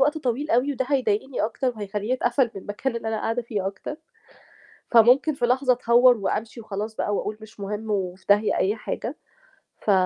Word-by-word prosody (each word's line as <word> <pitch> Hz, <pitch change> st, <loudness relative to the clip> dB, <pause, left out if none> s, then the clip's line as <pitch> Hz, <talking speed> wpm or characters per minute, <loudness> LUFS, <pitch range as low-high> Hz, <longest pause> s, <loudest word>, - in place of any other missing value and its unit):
وقت 295 Hz, +3 st, +3 dB
طويل 275 Hz, +2 st, -2 dB
أوي 250 Hz, +5 st, +3 dB
وده 260 Hz, -1 st, -2 dB
هيضايقني 255 Hz, -1 st, 0 dB
أكتر 230 Hz, +4 st, -1 dB
وهيخلّيني 210 Hz, +2 st, -3 dB
أتقفل 240 Hz, 0 st, +1 dB
من 195 Hz, -, -6 dB
المكان 235 Hz, +4 st, -3 dB
اللي 225 Hz, -, -4 dB
أنا 220 Hz, -, -1 dB
قاعدة 230 Hz, +2 st, -1 dB
فيه 205 Hz, -4 st, -3 dB
أكتر، 200 Hz, +9 st, -5 dB, 1.0 s
فممكن 245 Hz, +6 st, +6 dB
في 245 Hz, -4 st, 0 dB
لحظة 255 Hz, +1 st, +3 dB
أتهوّر 245 Hz, 0 st, +5 dB
وأمشي 215 Hz, +3 st, -3 dB
وخلاص 215 Hz, +1 st, -5 dB
بقى 205 Hz, -, -1 dB
وأقول 210 Hz, +1 st, -3 dB
مش 220 Hz, -1 st, -14 dB
مهم 210 Hz, +2 st, -4 dB
وفي 185 Hz, -2 st, -3 dB
داهية 205 Hz, +1 st, +4 dB
أي 200 Hz, +3 st, +1 dB
حاجة، 235 Hz, +4 st, -5 dB, 0.6 s
ف 210 Hz, -, +1 dB
230 Hz, 180 wpm, -24 LUFS, 210-255 Hz, 1.0 s, فممكن